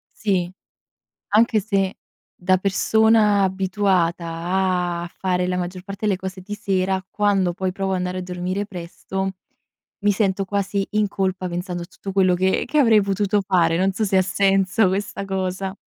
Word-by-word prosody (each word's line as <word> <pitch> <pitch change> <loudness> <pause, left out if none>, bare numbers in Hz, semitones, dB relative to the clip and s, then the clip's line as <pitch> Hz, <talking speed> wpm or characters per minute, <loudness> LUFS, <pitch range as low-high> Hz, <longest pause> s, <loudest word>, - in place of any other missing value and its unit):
Sì. 185 -4 0 0.8
Anche 220 +1 +3
se 195 -2 -1 0.4
da 185 +1 +2
persona 210 +1 +3
abituata 190 -2 +1 0.8
a 175 - -7
fare 180 -1 0
la 180 - -1
maggior 180 0 -4
parte 200 +2 -5
delle 200 -2 +2
cose 190 0 -6
di 205 +3 -6
sera, 190 -2 -1
quando 200 -4 +1
poi 185 0 -2
provo 195 0 -2
andare 180 0 -2
a 185 - -3
dormire 180 +3 -3
presto, 190 +1 -5 0.7
mi 205 0 +3
sento 195 -1 0
quasi 200 0 -1
in 210 -1 +2
colpa 185 -2 -2
pensando 175 0 -4
tutto 195 +1 -8
quello 185 -2 +3
che 190 +1 +1
che 305 - 0
avrei 225 -6 +6
potuto 200 +1 +1
fare. 175 -4 +2
Non 190 +1 +2
so 215 +3 -1
se 195 -2 +1
ha 185 - +5
senso 195 +1 +2
questa 195 +1 -3
cosa. 190 0 -3
190 Hz, 160 wpm, -22 LUFS, 185-200 Hz, 0.8 s, avrei